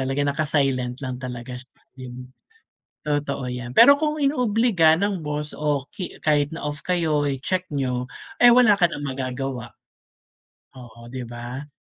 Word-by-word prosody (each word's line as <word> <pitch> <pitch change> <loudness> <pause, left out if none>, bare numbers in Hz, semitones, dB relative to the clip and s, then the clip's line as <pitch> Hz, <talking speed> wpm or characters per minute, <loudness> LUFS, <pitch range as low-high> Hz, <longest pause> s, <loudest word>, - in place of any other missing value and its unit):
talaga 135 +2 -1
naka-silent 135 -4 0
lang 130 -2 -4
talaga 125 0 -7
sa'kin. 125 0 -12 0.8
Totoo 140 -4 -2
'yan, 125 0 -6
pero 280 0 +8
kung 305 0 0
inoobliga 230 - +3
ng 200 +1 -1
boss, 150 -1 -4
o 145 -2 -1
ki 185 - -7
kahit 150 0 +1
na - - -7
off 150 0 -3
kayo 160 -5 +1
i-check 180 +7 -2
niyo, 125 -2 -1 0.3
eh, 245 - +8
wala 225 -5 +5
ka 175 - +5
ng 145 -3 -6
magagawa. 130 -2 -4 1.0
Oo, 120 0 -13
'di 125 -2 -6
ba. 120 +4 -7
145 Hz, 140 wpm, -23 LUFS, 125-165 Hz, 1.0 s, pero